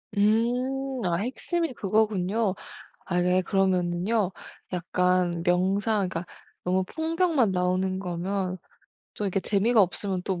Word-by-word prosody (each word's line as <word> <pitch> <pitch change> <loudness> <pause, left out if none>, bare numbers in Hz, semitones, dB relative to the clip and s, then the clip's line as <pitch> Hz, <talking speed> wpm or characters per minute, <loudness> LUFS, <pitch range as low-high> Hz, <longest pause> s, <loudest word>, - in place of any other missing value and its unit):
음 245 +6 +1 0.2
아 175 - +1
핵심이 260 - -2
그거군요. 210 -1 +1 0.5
아 180 -1 0
네 180 +1 +3
그러면은요, 185 +2 +1 0.4
약간 180 -1 +1
명상 195 +3 +2
그러니까 175 -1 -4 0.4
너무 185 +1 +1
풍경만 320 - +1
나오는 185 +1 0
거면 185 +1 -2 0.6
또 210 - -4
이렇게 195 0 0
재미가 215 +4 +3
없으면 190 0 0
또 185 -2 -2
190 Hz, 260 characters per minute, -26 LUFS, 180-220 Hz, 0.6 s, 네